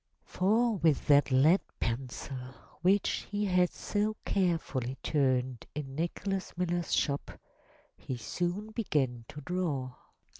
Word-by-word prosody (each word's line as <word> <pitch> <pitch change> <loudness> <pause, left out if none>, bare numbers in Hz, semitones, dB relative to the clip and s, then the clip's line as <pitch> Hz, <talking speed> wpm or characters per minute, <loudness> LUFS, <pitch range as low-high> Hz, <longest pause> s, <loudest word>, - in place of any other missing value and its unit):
For 220 +4 +2
with 160 -5 +2
that 145 -1 +6
lead 145 +8 +5 0.2
pencil 125 +1 -4 0.3
which 195 +3 +2
he 205 0 -1
had 180 -2 +3
so 210 +1 -1
carefully 160 -9 0
turned 130 -4 +1
in 140 -3 -5
Nicholas 180 +5 -3
Miller's 175 -1 -1
shop 140 -1 +1 0.7
he 130 - -5
soon 175 - -3
began 135 - 0
to 150 - -9
draw. 145 -6 -2
160 Hz, 115 wpm, -31 LUFS, 130-185 Hz, 0.7 s, that